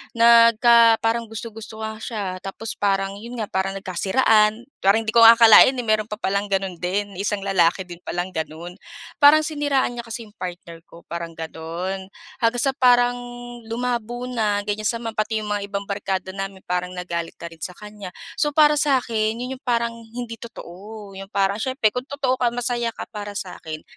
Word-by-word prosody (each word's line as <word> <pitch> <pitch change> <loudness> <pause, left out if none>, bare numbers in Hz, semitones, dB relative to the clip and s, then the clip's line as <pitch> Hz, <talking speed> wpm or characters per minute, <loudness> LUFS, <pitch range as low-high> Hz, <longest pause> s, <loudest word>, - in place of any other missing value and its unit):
nagka 230 0 +6
parang 230 0 0
gusto-gusto 220 0 -8
nga 220 0 -5
siya, 205 -6 -4
tapos 205 +3 -6
parang 195 0 0
yun 235 +3 -8
nga, 210 - -4
parang 190 +1 -1
nagkasiraan. 210 +4 +2 0.2
Parang 210 +4 +4
hindi 220 - -2
ko - - +7
nga 230 +1 +10
akalain, 230 +3 +8
eh, 245 - -3
meron 215 -1 +1
pa 210 - -5
palang 200 -1 -1
gano'n 195 -3 -2
din, 195 +1 -2
isang 200 0 -2
lalaki 190 -1 +2
din 175 -1 -11
pa - - -5
lang 180 +1 -2
gano'n. 160 +4 -6 0.4
Parang 310 +1 +7
siniraan 290 -4 0
niya 235 0 -6
kasi 230 +1 -5
yung 210 -1 -18
partner 175 -2 -7
ko, 170 - -15
parang 170 -1 -5
gano'n. 170 +4 -5 0.3
Hanggang 235 +1 +1
sa 270 - +3
parang 245 -1 +4 0.5
lumabo 240 +1 -3
na, 210 -4 0
ganyan 210 +1 -2
sama 230 -1 -4
pati 215 0 -1
yung - - -6
mga 205 -1 -2
ibang 200 0 -2
barkada 195 -2 -3
namin, 195 -1 -5
parang 180 0 -2
nagalit 170 -2 -4
na 170 - -6
rin 165 - -15
sa 180 - -3
kanya. 210 -2 -10 0.3
So 295 - +2
para 300 -1 +6
sa'kin, 235 -6 +1
yun 255 +2 -4
yung - - -65
parang 235 -1 +1
hindi 230 +1 -7
totoo, 205 -1 -10
yung 195 - -8
parang 200 +1 +1
siyempre 255 -3 +1
kung 250 - -2
totoo 275 -3 0
ka 245 - +2
masaya 240 -1 -1
ka - - -5
para 205 -1 -6
sa'kin, 160 -5 -6
215 Hz, 185 wpm, -22 LUFS, 190-235 Hz, 0.5 s, nga